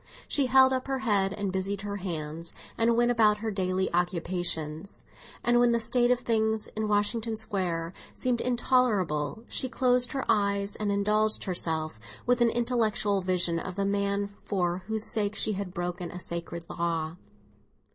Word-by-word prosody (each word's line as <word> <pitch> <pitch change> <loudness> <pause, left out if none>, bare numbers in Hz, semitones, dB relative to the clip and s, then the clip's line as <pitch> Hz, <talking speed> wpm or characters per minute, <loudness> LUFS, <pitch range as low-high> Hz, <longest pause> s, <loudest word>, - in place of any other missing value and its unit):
She 280 -3 +2
held 265 +1 +6
up 255 0 -2
her 270 -1 0
head 205 -7 +1
and 205 -1 -3
busied 190 +1 -2
her 205 0 -4
hands, 165 -3 -5 0.2
and 230 0 +2
went 240 0 +4
about 215 -3 +4
her 220 +1 -3
daily 190 -1 0
occupations; 175 -1 -2 0.4
and 240 0 +4
when 240 -1 +4
the 235 - +2
state 240 +2 +3
of 250 0 +2
things 220 -2 +1
in 215 0 -3
Washington 220 +2 0
Square 180 -5 -2 0.2
seemed 250 -2 0
intolerable, 225 - +1
she 260 - -2
closed 250 -1 +2
her 270 - -2
eyes 200 0 +1
and 210 -1 -1
indulged 210 +2 +1
herself 160 - -1 0.3
with 245 0 +2
an 235 - +5
intellectual 225 -4 +1
vision 180 -2 +1
of 185 +1 -6
the 200 0 0
man 200 0 0
for 180 -3 -1
whose 220 0 0
sake 210 -1 0
she 215 - 0
had 195 -2 -4
broken 175 -1 -4
a 180 - -7
sacred 170 -1 -5
law. 165 -1 -2
200 Hz, 165 wpm, -28 LUFS, 180-230 Hz, 0.4 s, held